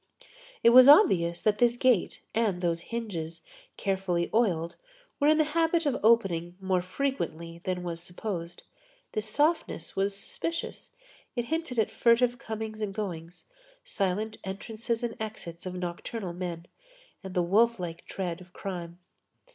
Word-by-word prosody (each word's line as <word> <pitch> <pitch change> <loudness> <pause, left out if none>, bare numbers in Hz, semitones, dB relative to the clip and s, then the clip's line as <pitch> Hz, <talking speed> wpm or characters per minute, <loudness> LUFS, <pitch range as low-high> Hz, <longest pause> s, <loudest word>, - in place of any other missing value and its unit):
It 235 - +8
was 255 +1 +10
obvious 180 - +6
that 210 -1 +2
this 240 0 +4
gate 245 -7 +2
and 215 -5 +1
those 170 -2 0
hinges, 170 -9 -4 0.3
carefully 190 -3 -1
oiled, 175 -8 +1 0.4
were 285 - +3
in 310 0 +6
the 310 - +5
habit 330 0 +2
of 275 -3 +1
opening 180 -6 +3
more 190 -1 +1
frequently 180 - -3
than 180 -1 -2
was 170 -1 -4
supposed. 175 -1 -5 0.5
This 215 0 -2
softness 295 +9 +1
was 195 +1 0
suspicious; 330 - -5 0.4
it 240 -1 -1
hinted 320 -7 -2
at 220 - +2
furtive 245 +1 +3
goings 220 -3 -5
and 200 -2 -3
comings, 175 -4 -5 0.4
silent 200 +3 -2
entrances 225 +4 -4
and 235 - -2
exits 190 -6 -6
of 185 - -5
nocturnal 180 +2 -4
men, 170 -2 -5 0.6
and 190 0 -7
the 180 - +3
wolf 225 +5 +3
like 170 -2 -5
tread 180 -2 -4
of 180 0 -16
crime. 175 -3 -6
195 Hz, 145 wpm, -28 LUFS, 175-235 Hz, 0.6 s, was